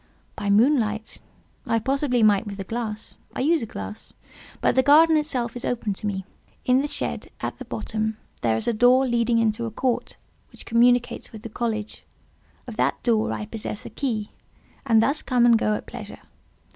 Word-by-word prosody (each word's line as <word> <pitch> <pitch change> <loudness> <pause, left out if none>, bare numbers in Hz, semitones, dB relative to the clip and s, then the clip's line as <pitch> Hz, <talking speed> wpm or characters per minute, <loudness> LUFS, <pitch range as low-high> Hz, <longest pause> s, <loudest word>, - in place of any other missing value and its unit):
"By 205 -2 -3
moonlight 220 -1 +2 0.5
I 230 - +2
possibly 265 0 +1
might 210 0 +4
with 200 0 -7
a - - -3
glass—I 220 +2 -6
use 320 +3 +3
a 225 - -4
glass—but 210 - -5
the 260 - +4
garden 315 +4 +6
itself 260 -7 -1
is 245 - -6
open 225 -4 -1
to 210 - -5
me. 190 -2 -3 0.4
In 255 +1 +4
the 290 - -2
shed, - - -3
at - - -4
the - - -7
bottom, 220 0 -3 0.2
there 110 -1 +2
is - - +2
a 235 - +2
door 245 +4 +5
leading 235 -1 +1
into 230 +1 +1
a - - -3
court, 245 +3 -2 0.3
which - - -11
communicates 245 +1 +2
with 220 -1 -11
the 230 - -6
college; 220 -1 -3 0.6
of 235 -3 -9
that - - 0
door 225 -3 +2
I 210 - -3
possess 215 -1 -6
the - - -9
key, 220 -7 -3 0.6
and 225 -2 +5
thus 285 +5 +2
come 245 -2 +2
and 235 -1 +6
go 215 -1 +1
at - - -6
pleasure. - - -9
230 Hz, 185 wpm, -24 LUFS, 215-250 Hz, 0.6 s, garden